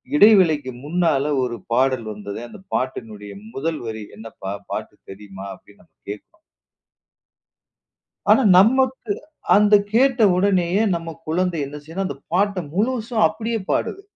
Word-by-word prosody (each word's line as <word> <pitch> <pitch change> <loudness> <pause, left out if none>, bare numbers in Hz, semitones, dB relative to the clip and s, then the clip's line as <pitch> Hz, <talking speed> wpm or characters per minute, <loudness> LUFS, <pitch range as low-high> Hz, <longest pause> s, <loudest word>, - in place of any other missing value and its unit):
இடைவேளைக்கு 175 - +5
முன்னால 160 -4 +1 0.2
ஒரு 120 -1 -2 0.2
பாடல் 130 -2 +1
வந்தது, 100 0 -7
அந்தப் 190 +9 -15
பாட்டினுடைய 110 -5 -4 0.2
முதல் 155 +3 -2
வரி 110 -1 -5
என்னப்பா 110 -3 -8 0.2
பாட்டு? - - -5 0.2
தெரியுமா 95 -1 -10
அப்டின்னு 100 +2 -21
நாம 80 -2 -32 0.2
கேக்கறோம். 210 - -9 1.9
ஆனா - - +6 0.2
நமக்கு 255 +1 +3 0.4
அந்த 210 0 +4 0.2
கேட்ட 255 -1 +4
உடனேயே 190 0 +2
நம்ம 165 -1 -5
குழந்தை 175 0 0
என்ன 145 +2 -8
செய்துனா 170 +5 -4
அந்தப் 140 -5 -7
பாட்ட 200 +2 +2 0.2
முழுசா 230 +2 -1
அப்டியே 225 +1 -3
பாடுது. 395 - -1
165 Hz, 125 wpm, -21 LUFS, -, 1.9 s, ஆனா